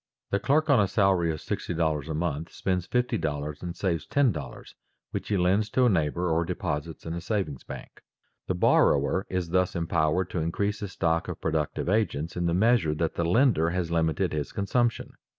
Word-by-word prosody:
The 100 - +2
clerk 155 +6 +2
on 140 -6 +5
a 100 - +3
salary 95 -4 +2
of 80 - -4
$60 80 -3 -2
a - - -1
month 80 0 -2
spends 90 -2 -2
$50 75 -12 -1
and 90 -1 -5
saves 85 -5 -1
$10 95 - -1 0.4
which - - -4
he 105 - +1
lends 95 +4 +2
to 130 +4 +3
a - - +5
neighbor 85 -1 0
or 80 +1 +2
deposits 80 -3 -4
in 80 - -4
a 85 - -4
savings 95 - -2
bank. - - -10 0.5
The 90 - 0
borrower 90 +1 +3
is 90 -2 -2
thus 90 +1 +1
empowered 85 +1 0
to 90 - -2
increase 100 +6 -1
his 100 -3 -6
stock 85 -1 0
of - - -5
productive 80 -1 -1
agents 90 -6 0
in 85 -1 0
the 85 - +1
measure 110 -6 +3
that 80 0 -1
the 85 - -1
lender 90 - +3
has 85 -1 -2
limited 80 +2 +1
his 75 -2 -3
consumption. 115 +4 0
85 Hz, 185 wpm, -27 LUFS, 80-100 Hz, 0.5 s, on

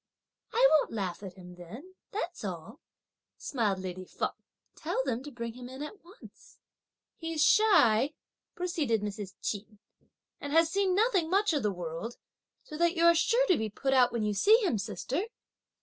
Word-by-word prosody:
"I - - +5
won't 310 -6 +3
laugh 195 -5 -3
at 190 -3 -8
him 180 -2 -12
then, 225 - -11 0.2
that's 355 - -5
all," 195 - -6 0.6
smiled 220 -8 -1
lady 185 0 -6
Feng; - - -3 0.4
"tell 310 -4 -2
them 250 -3 -2
to 295 - -8
bring 235 -2 -5
him 245 +1 -9
in 260 +3 -7
at 390 +7 -9
once." 370 +6 -17 0.6
"He's 325 -2 -1
shy," 295 - +4 0.4
proceeded 300 - -1
Mrs. 205 -2 -5
Ch'in, 210 0 -4 0.6
"and 285 0 -5
has 325 0 +4
seen 390 -1 +1
nothing 395 -6 +2
much 395 0 +2
of 295 - +1
the 210 - 0
world, 175 +5 -6 0.5
so 305 - -9
that 340 +1 +2
you 335 0 +3
are 340 - +8
sure 470 +9 +3
to 365 - +3
be 220 0 -2
put 270 +6 -1
out 250 -2 +5
when 235 -2 -2
you 210 0 0
see 405 - +5
him, 240 - 0
sister." 270 - -3
265 Hz, 175 wpm, -30 LUFS, 210-345 Hz, 0.6 s, are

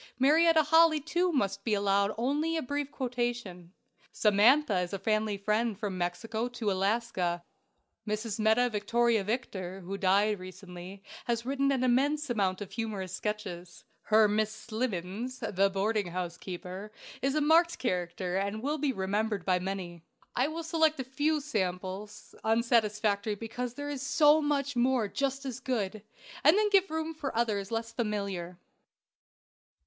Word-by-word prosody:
Marietta 315 +4 +5
Holley, 320 +1 +5
too, 345 +4 0
must 200 - -1
be 215 -1 +1
allowed 200 0 +2
only 295 +7 0
a 320 - -2
brief 285 +2 -2
quotation. 240 -10 -3 0.4
"Samantha" 220 +2 +4
is 180 +1 -3
a - - -1
family 215 0 0
friend 215 +2 0
from 205 -2 -3
Mexico 220 +6 -2
to 235 -4 -2
Alaska. 190 -3 0 0.6
Mrs. 215 +1 -2
Metta 220 +3 +4
Victoria 225 +1 +2
Victor, 195 -4 -4
who 195 +2 -5
died 205 +2 +3
recently, 185 +1 -10 0.2
has 235 -1 -1
written 275 +1 +1
an 260 -2 +1
immense 280 +3 +2
amount 195 -4 0
of 200 - -6
humorous 205 -5 -4
sketches. 190 -4 -5 0.2
Her 215 0 +5
"Miss 215 +1 +1
Slimmens," 215 +1 -4
the 195 -5 +1
boarding 200 +1 0
house 175 -1 -4
keeper, 185 +3 -7 0.3
is 275 +2 0
a - - +3
marked 330 +3 +4
character, 180 -3 -2
and 200 +3 -2
will 300 +3 -1
be 285 -1 +1
remembered 205 -1 -1
by 185 -1 +2
many. 180 -2 -5 0.3
I 255 +3 +2
will 325 +2 -5
select 320 -2 +2
a - - -1
few 290 +5 0
"samples," 195 -5 -4
unsatisfactory 215 -2 +1
because 235 +3 -5
there 290 0 -5
is 280 -3 -4
so 300 +2 +5
much 285 -2 0
more 245 -2 +2
just 275 +4 -2
as 260 -1 -4
good, 215 -6 -2 0.4
and 310 +7 +6
then 420 -1 +2
give 390 -1 +4
room 320 +1 -3
for 285 -7 -4
others 205 -4 0
less 230 0 -3
familiar. 200 -6 -3
220 Hz, 150 wpm, -30 LUFS, 195-265 Hz, 0.6 s, and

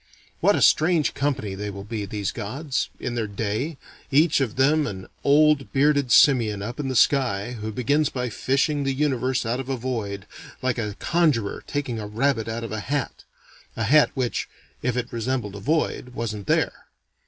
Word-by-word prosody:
What - - +4
a - - +2
strange 160 -1 +4
company 135 -8 -1
they 105 +2 -4
will 100 -1 -7
be, 105 0 -4
these 100 -1 -3
gods, 130 +7 -3
in 120 - -3
their 115 -2 -1
day, 110 +9 -3 0.3
each 150 +1 +4
of 125 -5 -1
them 145 +3 +3
an 95 -2 -6 0.2
old 150 -1 +4
bearded 140 -2 +3
simian 110 -7 +5
up 120 +6 -6
in 145 - -2
the 130 - -2
sky, 120 -6 +2
who 110 -2 -5
begins 145 +6 +1
by 125 -1 -3
fishing 140 +5 0
the 135 -1 -1
universe 130 -3 0
out 120 +3 -1
of 135 0 -6
a 135 - -1
void, 110 -6 -4 0.3
like 130 -1 -1
a 105 -3 -3
conjurer 150 -12 +1
taking 135 -6 -3
a 105 - -5
rabbit 115 +1 0
out 115 +1 -4
of 115 - -6
a 110 - -3
hat. 140 +5 -3 0.5
(A 110 - -1
hat 145 +7 +5
which, 125 -3 -2 0.3
if 125 0 -1
it 125 0 -3
resembled 115 -3 -2
a - - -6
void, 130 -1 -1
wasn't 105 -4 -4
there.) - - 0
125 Hz, 185 wpm, -24 LUFS, 110-140 Hz, 0.5 s, simian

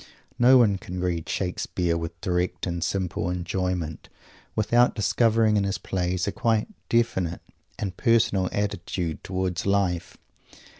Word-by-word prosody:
No 125 +2 +7
one 105 -6 +4
can 90 -1 -6
read 85 -3 -2
Shakespeare 90 -2 -1
with 85 0 -5
direct 90 -1 -1
and 85 -2 -2
simple 90 0 -1
enjoyment 90 -2 -3 0.5
without 120 +3 +3
discovering 110 0 +3
in 100 - +2
his 100 0 -1
plays 90 -1 -1
a 100 - -1
quite 110 0 +1 0.2
definite 95 -8 +1 0.4
and 95 -3 -4
personal 105 -5 +2
attitude 90 -5 -3
towards 95 -1 -2
life. 95 -4 0
95 Hz, 130 wpm, -25 LUFS, 90-105 Hz, 0.5 s, No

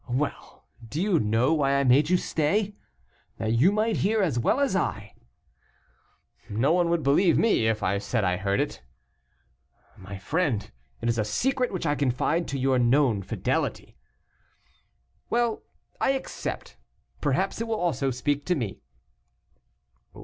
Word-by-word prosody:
"Well, 135 +4 -4 0.2
do 125 +7 -5
you 190 -3 +2
know 115 +6 +2
why 140 -3 +2
I 140 - +2
made 140 +4 +4
you 180 - +4
stay? 195 +7 0 0.6
that 110 0 -1
you 135 +12 +4
might 215 +1 0
hear 215 +2 +1
as 145 -10 0
well 185 - +1
as 280 -8 +1
I." 105 - -2 1.4
"No 120 +9 +2
one 175 -1 +2
would 170 -2 0
believe 155 +6 +4
me 210 - +3
if 110 -2 0
I 100 +2 +1
said 105 +2 -1
I 90 -1 +1
heard 100 +1 0
it." - - -2 1.1
"My 95 +1 -9
friend, 135 - -1 0.3
it 115 - -2
is 115 -1 +1
a - - +2
secret 250 - 0
which 185 -3 -4
I 145 - +2
confide 145 +5 0
to 140 - -3
your 130 -1 +2
known 120 -3 +3
fidelity." - - -2 1.3
"Well, 235 -1 0 0.4
I 270 - +2
accept. 270 - -5 0.4
Perhaps 185 +10 0
it 230 - -2
will 220 -1 -1
also 140 -6 0
speak 140 +3 -1
to 180 - +2
me." 115 - -4
140 Hz, 150 wpm, -26 LUFS, 115-180 Hz, 1.4 s, made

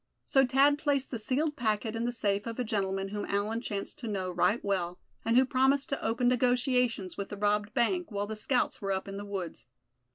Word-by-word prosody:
So 270 -2 +4
Thad 280 +3 +4
placed 285 -3 0
the 235 - -3
sealed 290 +7 0
packet 220 -3 -1
in 230 +1 -1
the 240 - 0
safe 205 -3 0
of 230 - -5
a 250 - 0
gentleman 195 -3 -1
whom 205 0 -4
Allan 210 +3 -1
chanced 200 -4 -5
to 235 - -5
know 190 -3 -2
right 180 +6 +2
well, 180 -3 -1 0.3
and 230 +1 +2
who 260 - +6
promised 265 +2 +2
to 275 - -3
open 235 +2 +1
negotiations 250 - +1
with 200 - -4
the 205 - -6
robbed 210 +2 0
bank, 350 +8 +1
while 205 0 -1
the 220 +1 -5
scouts 245 +4 0
were 195 -1 -1
up 190 +1 -3
in 195 0 -6
the 205 - -6
woods. 180 - -6
225 Hz, 220 wpm, -30 LUFS, 200-255 Hz, 0.3 s, who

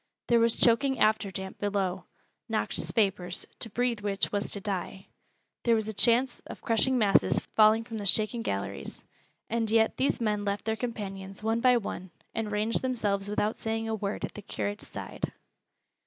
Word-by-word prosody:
There 235 -1 +5
was 230 0 +3
choking 265 +3 +5
after 215 -2 +3
damp 190 0 -6
below, 195 -2 -1 0.4
noxious - - 0
vapors, 190 -4 0
to 225 - -1
breathe 240 +1 0
which 200 -2 0
was 205 -1 -1
to 200 - -4
die; 190 -1 -4 0.5
there 235 -1 +3
was 220 -1 0
the 220 - -4
chance 240 +4 +3
of - - -8
crushing 245 +3 +2
masses 205 -4 +4 0.2
falling 220 +1 +6
from 225 -1 -6
the 200 - -3
shaken 215 +4 +1
galleries 100 - -4 0.4
and 225 -1 -1
yet 225 0 +3
these 270 - +1
men 210 -3 0
left 200 0 -2
their 220 0 0
companions 195 -4 -5
one 225 +1 +1
by 250 0 +5
one, 190 -4 -5 0.2
and 220 -2 -2
ranged 215 +2 0
themselves 205 -6 -1
without 210 +1 0
saying 225 0 -3
a 225 - -1
word 205 -1 -2
at - - -10
the 210 - -8
curate's 205 +1 -4
side. - - -5
215 Hz, 175 wpm, -29 LUFS, 200-230 Hz, 0.5 s, falling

